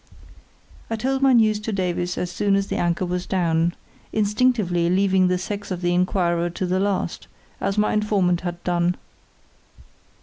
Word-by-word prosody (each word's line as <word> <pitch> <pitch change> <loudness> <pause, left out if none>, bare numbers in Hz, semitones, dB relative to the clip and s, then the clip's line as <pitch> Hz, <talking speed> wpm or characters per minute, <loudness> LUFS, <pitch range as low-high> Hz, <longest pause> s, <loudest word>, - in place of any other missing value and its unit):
I 225 - -1
told 265 +4 -1
my 270 -1 +5
news 215 -3 +4
to 215 +1 -4
Davies 180 -2 -2
as 180 - -2
soon 200 +1 +1
as 200 0 +1
the - - -4
anchor 175 +1 0
was 180 0 -3
down, 170 -2 +1 0.4
instinctively 210 -5 +1
leaving 190 0 +3
the 180 0 +1
sex 205 +3 -5
of 180 -2 -4
the 175 0 +1
inquirer 175 -1 +1
to 175 +2 -3
the 185 +1 0
last, 200 -1 -2 0.3
as 195 - -2
my 210 - +2
informant 200 -5 +1
had 175 -1 -5
done. 175 0 +1
185 Hz, 165 wpm, -23 LUFS, 175-210 Hz, 0.4 s, my